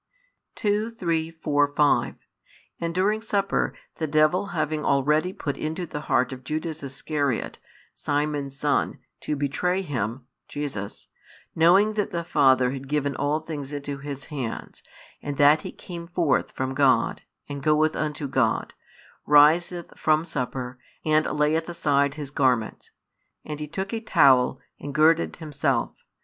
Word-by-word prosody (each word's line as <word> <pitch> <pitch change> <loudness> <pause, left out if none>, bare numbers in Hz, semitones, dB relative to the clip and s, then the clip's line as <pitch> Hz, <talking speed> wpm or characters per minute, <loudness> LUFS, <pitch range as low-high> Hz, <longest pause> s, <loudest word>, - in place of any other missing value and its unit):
2, 210 +1 0
3, 165 -8 -1
4, 145 -3 0
5 145 -1 +3 0.6
And 170 0 -3
during 210 +4 +1
supper, 200 -3 0 0.3
the 160 - -2
devil 155 +6 +3
having 155 -4 -2
already 150 +6 +2
put 145 -6 -4
into 160 +3 -3
the 150 - -6
heart 130 -2 +1
of 130 0 -10
Judas 155 +3 -4
Iscariot, 140 -1 -2 0.3
Simon's 145 -1 -2
[son], 145 0 0 0.2
to 150 - -2
betray 180 +7 0
Him, 120 - -3 0.2
[Jesus,] 135 -9 -5 0.5
knowing 190 +6 +5
that 210 -1 -1
the 170 -1 -3
Father 130 -6 +3
had 135 0 -6
given 145 -1 -1
all 145 +3 0
things 150 -3 -6
into 140 -1 -5
His 140 -1 -6
hands, 125 -6 -5 0.4
and 145 -1 -5
that 145 +2 +6
He - - -6
came 170 -2 -9
forth 170 -5 +1
from 130 0 -3
God, 135 -1 +2 0.3
and 140 -1 -6
goeth 155 +1 +2
unto 150 -1 -2
God, 130 -4 0 0.5
riseth 160 +4 +4
from 155 +1 +2
supper, 125 -4 -4 0.3
and 155 0 +3
layeth 150 +2 +1
aside 140 -4 +1
His 145 -3 -6
garments; 125 -6 0 0.6
and 150 -1 -5
He 150 - -4
took 190 +7 -4
a 225 - -1
towel, 135 - +4 0.2
and 145 -1 -7
girded 160 +2 +3
Himself. 150 -3 -1
150 Hz, 140 wpm, -25 LUFS, 140-165 Hz, 0.6 s, that